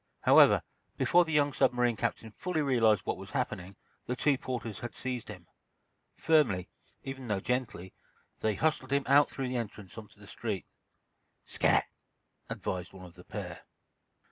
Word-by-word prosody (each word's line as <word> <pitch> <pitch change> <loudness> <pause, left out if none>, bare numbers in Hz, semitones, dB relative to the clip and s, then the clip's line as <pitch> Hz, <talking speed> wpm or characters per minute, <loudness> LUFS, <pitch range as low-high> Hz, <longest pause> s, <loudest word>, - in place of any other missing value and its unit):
However, - - +6 0.3
before 175 0 +4
the 160 - -5
young 145 -2 +2
submarine 125 -2 +2
captain 115 -1 -3
fully 160 - -2
realized 115 -7 +3
what - - -1
was - - -9
happening, 95 +1 -3 0.3
the 125 - -1
two 145 +2 +2
porters 125 -5 -5
had 120 - -7
seized 125 -3 -4
him. 90 -5 -9 0.7
Firmly, 130 - +2 0.3
even 135 -1 -6
though 105 -3 0
gently, 120 -6 -3 0.5
they 110 -1 0
hustled 155 -4 0
him 140 0 +2
out 140 +2 +5
through 135 -2 -4
the 125 - -2
entrance 105 -3 -6
onto 105 -1 -15
the 105 - -14
street. 105 -2 -4 0.8
"Scat!" - - +2 0.6
advised 90 0 -4
one 95 -1 -11
of 90 - -13
the - - -15
pair. - - -7
120 Hz, 155 wpm, -30 LUFS, 105-135 Hz, 0.8 s, However